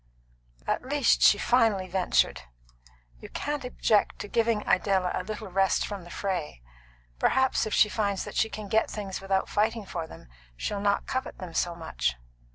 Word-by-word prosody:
"At -, -, 0 dB
least," 275 Hz, 0 st, +2 dB
she 205 Hz, -, +7 dB
finally 220 Hz, -5 st, +2 dB
ventured, 185 Hz, 0 st, +1 dB, 0.8 s
"you -, -, -10 dB
can't 295 Hz, -1 st, -3 dB
object 225 Hz, -4 st, +1 dB
to -, -, -6 dB
giving 225 Hz, 0 st, +1 dB
Idella 190 Hz, -3 st, +2 dB
a -, -, -1 dB
little 215 Hz, +1 st, -6 dB
rest 195 Hz, +1 st, +2 dB
from 200 Hz, -4 st, -6 dB
the -, -, -12 dB
fray. 180 Hz, -, -3 dB, 0.6 s
Perhaps 265 Hz, -, +2 dB
if 215 Hz, -, -4 dB
she -, -, +6 dB
finds 205 Hz, -2 st, -1 dB
that -, -, -8 dB
she 220 Hz, -, +1 dB
can 215 Hz, -2 st, -7 dB
get 220 Hz, +3 st, +2 dB
things 195 Hz, -3 st, -5 dB
without 195 Hz, 0 st, 0 dB
fighting 220 Hz, +1 st, 0 dB
for 170 Hz, -4 st, -5 dB
them, -, -, -13 dB, 0.3 s
she'll 200 Hz, -, -3 dB
not 200 Hz, 0 st, +1 dB
covet 260 Hz, 0 st, -3 dB
them 180 Hz, -3 st, -8 dB
so 175 Hz, -1 st, 0 dB
much." 60 Hz, -, -2 dB
200 Hz, 170 wpm, -27 LUFS, 185-220 Hz, 0.8 s, she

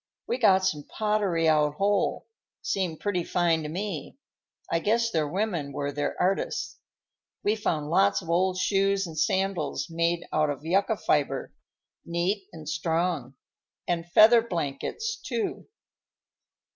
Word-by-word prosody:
We 250 Hz, -, -2 dB
got 190 Hz, -5 st, +5 dB
some 150 Hz, -6 st, 0 dB
pottery 205 Hz, -6 st, 0 dB
out 150 Hz, -1 st, +3 dB
whole; 200 Hz, +4 st, +1 dB, 0.4 s
seemed 180 Hz, -5 st, -1 dB
pretty 185 Hz, -4 st, 0 dB
fine 170 Hz, -2 st, +1 dB
to 150 Hz, -, -5 dB
me. 175 Hz, -, -5 dB, 0.5 s
I 165 Hz, -, +2 dB
guess 230 Hz, +5 st, +1 dB
their 155 Hz, -3 st, +1 dB
women 175 Hz, -5 st, -2 dB
were 140 Hz, +1 st, -2 dB
their 145 Hz, +1 st, -3 dB
artists. 190 Hz, +2 st, -1 dB, 0.6 s
We 210 Hz, -, +2 dB
found 155 Hz, -8 st, -2 dB
lots 195 Hz, +3 st, +4 dB
of -, -, -12 dB
old 180 Hz, +2 st, +1 dB
shoes 195 Hz, +1 st, +2 dB
and 165 Hz, -2 st, -8 dB
sandals 165 Hz, -2 st, -1 dB
made 170 Hz, +1 st, 0 dB
out 155 Hz, -1 st, +2 dB
of 145 Hz, +1 st, -5 dB
yucca 195 Hz, +5 st, +2 dB
fiber, 140 Hz, -6 st, 0 dB, 0.5 s
neat 180 Hz, +4 st, -1 dB
and 155 Hz, -2 st, -10 dB
strong; 155 Hz, -3 st, -1 dB, 0.5 s
and 170 Hz, -1 st, -2 dB
feather 230 Hz, +4 st, +7 dB
blankets, 225 Hz, -, -3 dB
too." 240 Hz, -10 st, -3 dB
175 Hz, 135 wpm, -27 LUFS, 155-200 Hz, 0.6 s, feather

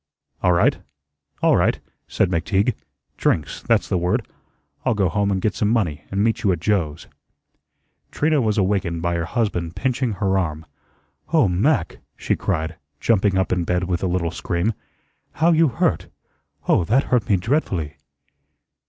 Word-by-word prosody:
"All 90 Hz, -, +3 dB
right, 85 Hz, -, +3 dB, 0.6 s
all -, -, +5 dB
right," -, -, +2 dB, 0.3 s
said 95 Hz, -, 0 dB
McTeague. 100 Hz, +6 st, +1 dB, 0.4 s
"Drinks, 75 Hz, -4 st, 0 dB
that's -, -, +1 dB
the 90 Hz, -, 0 dB
word. 100 Hz, +7 st, 0 dB, 0.6 s
I'll 115 Hz, -, +1 dB
go 100 Hz, -3 st, +2 dB
home 100 Hz, +2 st, 0 dB
and 95 Hz, -1 st, 0 dB
get 105 Hz, +2 st, 0 dB
some 105 Hz, -3 st, 0 dB
money 85 Hz, -11 st, 0 dB
and 100 Hz, +1 st, 0 dB
meet 115 Hz, 0 st, +1 dB
you 100 Hz, -, +2 dB
at 90 Hz, -, -1 dB
Joe's." 85 Hz, -5 st, -1 dB, 1.0 s
Trina 155 Hz, -1 st, +1 dB
was 110 Hz, -2 st, 0 dB
awakened 95 Hz, -4 st, 0 dB
by 85 Hz, 0 st, 0 dB
her 85 Hz, -1 st, -1 dB
husband 90 Hz, -5 st, -2 dB
pinching 130 Hz, -2 st, -1 dB
her 95 Hz, -1 st, +1 dB
arm. 80 Hz, -3 st, -3 dB, 0.7 s
"Oh, 155 Hz, -9 st, +4 dB
Mac," 100 Hz, -, +1 dB, 0.2 s
she -, -, 0 dB
cried, 80 Hz, +1 st, -2 dB, 0.2 s
jumping 100 Hz, -2 st, +2 dB
up 95 Hz, -, 0 dB
in 90 Hz, -1 st, +1 dB
bed 90 Hz, +1 st, 0 dB
with 90 Hz, -1 st, -1 dB
a 95 Hz, -, 0 dB
little 90 Hz, -2 st, -1 dB
scream, 85 Hz, +6 st, -1 dB, 0.6 s
"how 165 Hz, +2 st, +3 dB
you 165 Hz, 0 st, +4 dB
hurt! 125 Hz, -, 0 dB, 0.6 s
Oh, -, -, +4 dB
that 130 Hz, -, +3 dB
hurt 120 Hz, -6 st, +2 dB
me 100 Hz, -, +4 dB
dreadfully." 90 Hz, -, -1 dB
95 Hz, 160 wpm, -22 LUFS, 85-110 Hz, 1.0 s, all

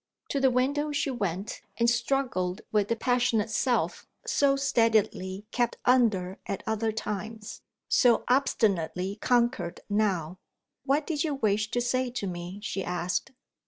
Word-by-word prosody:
To 280 Hz, -, 0 dB
the 270 Hz, -1 st, +4 dB
window 280 Hz, +4 st, +1 dB
she 290 Hz, -1 st, 0 dB
went, 200 Hz, -4 st, -3 dB, 0.2 s
and 235 Hz, -, +3 dB
struggled 235 Hz, -6 st, 0 dB
with 210 Hz, -2 st, +2 dB
the 230 Hz, -, +1 dB
passionate 230 Hz, -3 st, +1 dB
self 240 Hz, +2 st, 0 dB, 0.2 s
so 280 Hz, -1 st, +3 dB
steadily 220 Hz, -7 st, +1 dB
kept 240 Hz, -1 st, 0 dB
under 210 Hz, -7 st, +3 dB
at 195 Hz, -, -4 dB
other 220 Hz, 0 st, 0 dB
times; 215 Hz, 0 st, -5 dB, 0.3 s
so 245 Hz, -3 st, +4 dB
obstinately 200 Hz, -, +1 dB
conquered 240 Hz, -8 st, +1 dB
now. 185 Hz, -5 st, 0 dB, 0.5 s
"What 285 Hz, +2 st, +2 dB
did 300 Hz, -4 st, -1 dB
you 305 Hz, -3 st, -1 dB
wish 210 Hz, -4 st, +1 dB
to 245 Hz, +1 st, 0 dB
say 255 Hz, +1 st, 0 dB
to 225 Hz, -, -3 dB
me?" 175 Hz, +1 st, -5 dB
she 195 Hz, -2 st, -3 dB
asked. 180 Hz, 0 st, -2 dB
225 Hz, 140 wpm, -28 LUFS, 195-255 Hz, 0.5 s, the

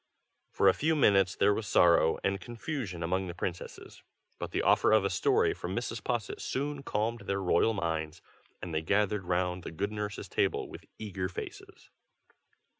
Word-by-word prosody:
For -, -, +2 dB
a 95 Hz, -, +7 dB
few 160 Hz, +8 st, +1 dB
minutes 95 Hz, -, +4 dB
there 105 Hz, +1 st, +4 dB
was 105 Hz, -1 st, -3 dB
sorrow 85 Hz, -3 st, +4 dB
and 100 Hz, 0 st, 0 dB
confusion 120 Hz, -, -5 dB
among 95 Hz, +3 st, -1 dB
the 85 Hz, -, -6 dB
princesses; 90 Hz, 0 st, -6 dB, 0.4 s
but -, -, -4 dB
the -, -, -1 dB
offer -, -, +4 dB
of 110 Hz, -2 st, +4 dB
a 100 Hz, -, 0 dB
story 420 Hz, 0 st, +2 dB
from -, -, -5 dB
Mrs. -, -, -3 dB
Posset 415 Hz, +1 st, -2 dB
soon 145 Hz, +1 st, -3 dB
calmed 115 Hz, -2 st, -2 dB
their 100 Hz, 0 st, 0 dB
royal 95 Hz, +4 st, +2 dB
minds, 80 Hz, -3 st, -2 dB, 0.4 s
and 90 Hz, -2 st, -5 dB
they 80 Hz, -, 0 dB
gathered 105 Hz, +3 st, +1 dB
round 90 Hz, 0 st, 0 dB
the -, -, -7 dB
good 100 Hz, +6 st, -3 dB
nurse's 105 Hz, -2 st, -4 dB
table -, -, 0 dB
with -, -, -11 dB
eager 95 Hz, -4 st, -4 dB
faces. 95 Hz, -, -9 dB
100 Hz, 175 wpm, -30 LUFS, 90-110 Hz, 0.4 s, a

